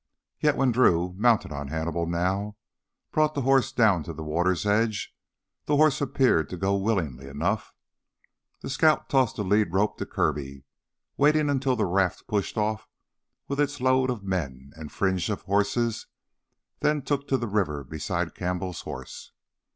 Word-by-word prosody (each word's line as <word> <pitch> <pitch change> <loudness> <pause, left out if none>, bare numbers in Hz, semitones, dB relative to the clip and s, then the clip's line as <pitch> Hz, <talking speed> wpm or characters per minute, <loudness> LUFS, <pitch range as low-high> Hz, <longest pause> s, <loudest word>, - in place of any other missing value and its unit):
Yet 150 -1 +2
when 135 -2 +3
Drew, 90 -8 +3
mounted 115 -3 +2
on 70 -1 -5
Hannibal 80 +3 -2
now, 95 +5 -1 0.6
brought 155 0 +2
the 140 - -1
horse 135 -1 +3
down 110 -9 +3
to 85 - -6
the 80 +1 -7
water's 85 +4 0
edge, 105 +1 0 0.5
the 150 - +1
horse 155 -1 +4
appeared 130 - +2
to 90 - -6
go 95 +3 +1
willingly 90 - -1
enough. 85 +10 -2 0.9
The - - -5
scout 155 +3 +2
tossed 130 -5 +2
the 105 - -2
lead 100 -1 +2
rope 100 +3 0
to - - -4
Kirby, 70 -2 -2 0.5
waiting 150 0 +3
until 135 -2 +1
the 110 -3 +1
raft 95 0 0
pushed 105 0 -2
off 110 0 -1 0.6
with 140 0 -3
its 145 0 0
load 130 0 +2
of 120 -5 -3
men 70 -9 -4
and 80 -1 -9
fringe 95 0 0
of 105 - -3
horses, 105 +3 0 0.7
then 150 -2 +1
took 140 +1 -2
to 135 - +2
the 120 - -3
river 90 -9 -1
beside 80 +4 -3
Campbell's 90 -1 -3
horse. - - -9
100 Hz, 160 wpm, -26 LUFS, 85-130 Hz, 0.9 s, horse